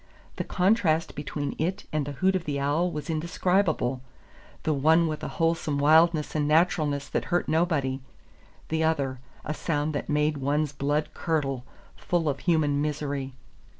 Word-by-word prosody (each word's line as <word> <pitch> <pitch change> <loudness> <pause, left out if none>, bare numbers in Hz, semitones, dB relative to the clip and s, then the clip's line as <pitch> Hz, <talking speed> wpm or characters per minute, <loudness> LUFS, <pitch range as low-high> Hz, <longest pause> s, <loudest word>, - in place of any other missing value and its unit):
The - - -1
contrast 180 -4 +2
between 145 0 -4
it 185 +5 -1
and 150 -2 0
the 145 - -4
hoot 190 +6 +2
of 185 - -2
the 145 -2 -2
owl 150 +6 +1
was 150 -3 -5
indescribable, 165 -4 0 0.6
the 155 - +1
one 160 +4 +4
with 155 -1 -4
a - - -2
wholesome 165 -3 +1
wildness 155 +2 +4
and 150 -1 0
naturalness 155 -3 +2
that - - -1
hurt 175 0 0
nobody; 155 -5 +1 0.7
the 160 0 0
other, 140 -5 0 0.3
a 150 - -2
sound 150 -1 -1
that 145 - -4
made 150 0 +1
one's 145 +2 0
blood 145 +2 0
curdle, 135 -6 -1 0.3
full 170 -3 -1
of 140 -2 -1
human 150 -5 +2
misery. 145 -3 -3
155 Hz, 155 wpm, -27 LUFS, 145-165 Hz, 0.7 s, one